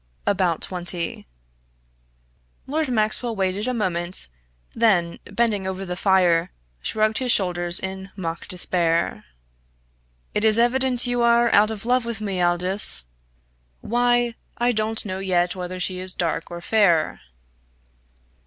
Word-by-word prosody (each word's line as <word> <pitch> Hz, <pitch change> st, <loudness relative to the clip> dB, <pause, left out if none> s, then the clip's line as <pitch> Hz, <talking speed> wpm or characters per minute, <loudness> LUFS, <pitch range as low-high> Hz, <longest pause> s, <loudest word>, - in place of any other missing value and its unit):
"About 185 Hz, -5 st, 0 dB
twenty." 175 Hz, -, -2 dB, 1.4 s
Lord 305 Hz, +3 st, -2 dB
Maxwell 225 Hz, 0 st, +1 dB
waited 195 Hz, +3 st, -1 dB
a -, -, 0 dB
moment, 175 Hz, -, +1 dB, 0.4 s
then, 195 Hz, -7 st, +1 dB
bending 215 Hz, -5 st, -1 dB
over 190 Hz, +1 st, -4 dB
the 180 Hz, -1 st, -4 dB
fire, 180 Hz, -3 st, +2 dB, 0.3 s
shrugged 215 Hz, -, 0 dB
his 255 Hz, -2 st, +1 dB
shoulders 175 Hz, -3 st, +2 dB
in 190 Hz, 0 st, -6 dB
mock 170 Hz, -3 st, -5 dB
despair. 170 Hz, -, 0 dB, 1.1 s
"It 210 Hz, -, 0 dB
is 220 Hz, 0 st, +6 dB
evident 250 Hz, +1 st, +5 dB
you 245 Hz, 0 st, 0 dB
are 235 Hz, 0 st, +3 dB
out 210 Hz, +1 st, +5 dB
of 220 Hz, 0 st, -6 dB
love 250 Hz, +1 st, +2 dB
with 230 Hz, -1 st, -4 dB
me, 195 Hz, -4 st, -2 dB
Aldous. 175 Hz, -, +1 dB, 0.8 s
Why, 240 Hz, 0 st, +1 dB, 0.2 s
I 240 Hz, +1 st, +1 dB
don't 220 Hz, 0 st, -2 dB
know 190 Hz, -2 st, -4 dB
yet 180 Hz, -1 st, 0 dB
whether 185 Hz, 0 st, -6 dB
she 180 Hz, 0 st, -1 dB
is 185 Hz, 0 st, -6 dB
dark 165 Hz, -2 st, -2 dB
or 170 Hz, 0 st, -8 dB
fair!" 175 Hz, -6 st, +2 dB
190 Hz, 130 wpm, -22 LUFS, 175-230 Hz, 1.4 s, is